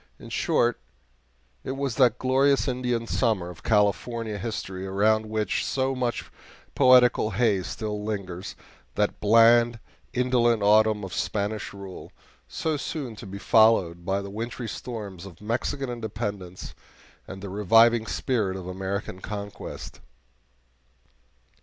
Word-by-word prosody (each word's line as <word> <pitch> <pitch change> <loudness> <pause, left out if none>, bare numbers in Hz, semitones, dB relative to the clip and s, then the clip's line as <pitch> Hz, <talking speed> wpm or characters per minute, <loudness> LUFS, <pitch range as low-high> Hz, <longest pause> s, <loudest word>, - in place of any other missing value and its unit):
In - - -12
short, 120 0 +1 0.8
it 130 - -3
was 135 -2 -2
that 125 -3 +4
glorious 135 +3 +2
Indian 125 -2 -1
summer 95 -6 0
of 85 - -14
California 105 +1 0
history 95 -4 -5
around 110 +3 +2
which 110 -2 -1
so 135 0 0
much 125 -2 -2 0.5
poetical 125 -4 +5
haze 105 -3 +1
still 105 -2 -4
lingers 100 -4 -5 0.4
that 105 0 0
bland, 115 +2 +5 0.3
indolent 120 -3 +2
autumn 105 0 +4
of 95 - -6
Spanish 100 +5 -2
rule, 100 -2 -10 0.4
so 160 -2 -2
soon 140 -5 -5
to 105 - -9
be 100 +1 -7
followed 100 -6 +3
by 95 +2 -1
the 100 - -8
wintry 115 +3 -5
storms 100 -7 -7
of 85 -4 -14
Mexican 125 +5 -2
independence 105 -6 -5 0.5
and 95 +1 -9
the 100 - -5
reviving 115 +4 +4
spring 105 -7 -1
of 95 - -8
American 95 +1 -4
conquest. 100 0 -7
110 Hz, 125 wpm, -26 LUFS, 100-120 Hz, 0.8 s, poetical